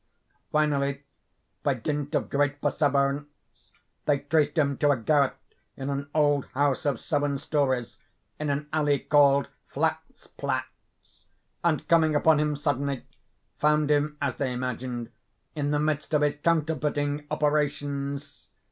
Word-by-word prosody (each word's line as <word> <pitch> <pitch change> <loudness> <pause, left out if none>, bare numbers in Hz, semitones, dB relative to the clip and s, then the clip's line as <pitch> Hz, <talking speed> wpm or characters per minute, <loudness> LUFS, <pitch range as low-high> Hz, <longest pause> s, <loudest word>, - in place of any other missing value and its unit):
Finally, 140 -2 +1 0.6
by 140 - +1
dint 145 +4 -3
of - - 0
great 145 0 +1
perseverance, 145 0 -1 0.4
they 145 -1 +3
traced 145 +1 +1
him 140 -3 +2
to 145 +2 +2
a 140 - +4
garret 140 +4 +2 0.4
in 135 +1 -3
an 140 0 -3
old 145 -2 +3
house 145 +1 +1
of 135 -5 0
seven 145 -2 0
stories, 130 -7 -1 0.4
in 150 -1 -2
an 145 +1 -1
alley 145 -2 +2
called 140 -2 +4 0.2
Flatzplatz,—and, 170 -3 -4
coming 160 -2 +4
upon 155 +1 +4
him 150 0 +1
suddenly, 140 -2 -1 0.5
found 150 0 +3
him, 150 0 +1
as 140 -4 -1
they 135 -2 -1
imagined, 125 -1 -4 0.4
in 145 -2 -2
the 150 - +1
midst 150 0 0
of 150 - +3
his 145 - +2
counterfeiting 150 -2 0
operations. 145 -1 -2
145 Hz, 130 wpm, -27 LUFS, 140-150 Hz, 0.6 s, a